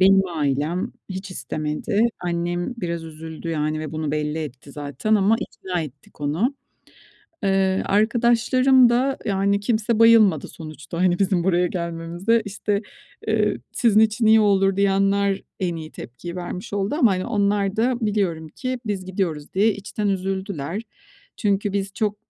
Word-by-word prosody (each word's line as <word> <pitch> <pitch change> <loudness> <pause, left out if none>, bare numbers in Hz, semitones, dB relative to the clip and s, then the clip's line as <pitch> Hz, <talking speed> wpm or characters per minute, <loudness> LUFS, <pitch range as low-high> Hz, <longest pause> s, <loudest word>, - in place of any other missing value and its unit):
benim 195 0 +6
ailem 155 +2 -1 0.2
hiç 190 0 -6
istemedi. 155 +3 -2 0.2
Annem 175 +4 -2
biraz 170 -6 -3
üzüldü 160 +1 -8
yani 155 -1 -1
ve 155 -1 -6
bunu 155 -1 -2
belli 150 +1 -1
etti 140 -2 -7
zaten 145 +9 -1
ama 210 +2 +4
ikna 180 -2 -4
ettik 145 -1 -10
onu. 165 - 0 0.9
Iıı, 195 -1 +2
arkadaşlarım 240 +4 +4
da, 260 +3 +1
yani, 200 -1 +1
kimse 220 +1 0
bayılmadı 225 -8 +5
sonuçta, 155 -1 -8
hani, 180 -1 +2
bizim 185 -3 +1
buraya 180 -1 +3
gelmemize. 170 +5 -1
İşte, 205 0 -2 0.5
ııı, - - +2 0.2
"Sizin 220 -4 +4
için 220 +1 +2
iyi 220 0 +7
olur." 195 -2 +3
diyenler 195 0 +2 0.2
en 175 -3 -1
iyi 155 -1 -7
tepkiyi 170 +9 -8
vermiş 180 +2 -6
oldu 200 +4 -1
ama, 255 -8 +4
hani, 185 -1 -1
onlar 205 -3 +1
da 245 +3 +2
biliyorum 195 -8 -1
ki 255 - -4
biz 200 -3 -2
gidiyoruz 180 -6 -3
diye 210 +4 +4
içten 205 +1 -3
üzüldüler. 190 -2 -2 0.5
Çünkü 200 -1 0
biz 195 -1 -2
çok, 210 0 -1
195 Hz, 145 wpm, -23 LUFS, 165-210 Hz, 0.9 s, iyi